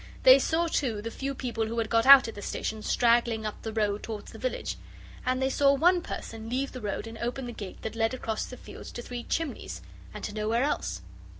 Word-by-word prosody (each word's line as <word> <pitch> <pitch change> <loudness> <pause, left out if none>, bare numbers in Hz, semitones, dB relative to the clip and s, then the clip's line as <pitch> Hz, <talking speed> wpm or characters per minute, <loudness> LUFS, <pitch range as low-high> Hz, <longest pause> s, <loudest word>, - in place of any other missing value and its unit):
They 260 +1 +9
saw, 325 +5 +1
too, 260 -9 0
the 230 - -4
few 275 +2 -4
people 235 -4 -2
who 230 +1 -4
had 225 -1 +1
got 230 +1 +3
out 275 -2 +10
at 225 - -5
the 205 - -8
station 220 +1 -3
straggling 235 -1 +2
up 215 - -5
the 225 - -4
road 210 -2 0
towards 215 -2 -6
the - - -11
village - - -3 0.5
and 255 0 +2
they 265 0 +1
saw 280 0 +4
one 350 +5 +4
person 225 -7 -6
leave 265 +3 -1
the 255 - -8
road 205 +1 -3
and 225 0 -9
open 245 +2 -3
the 240 - -5
gate 205 -5 -8
that 220 - -4
led 225 +2 +1
across 220 -3 -3
the 250 - -9
fields - - -10
to 240 - -6
Three 245 0 -5
Chimneys 325 -4 -3 0.3
and - - -9
to 210 - -4
nowhere 220 +3 0
else. 290 - -2
235 Hz, 230 wpm, -28 LUFS, 220-265 Hz, 0.5 s, out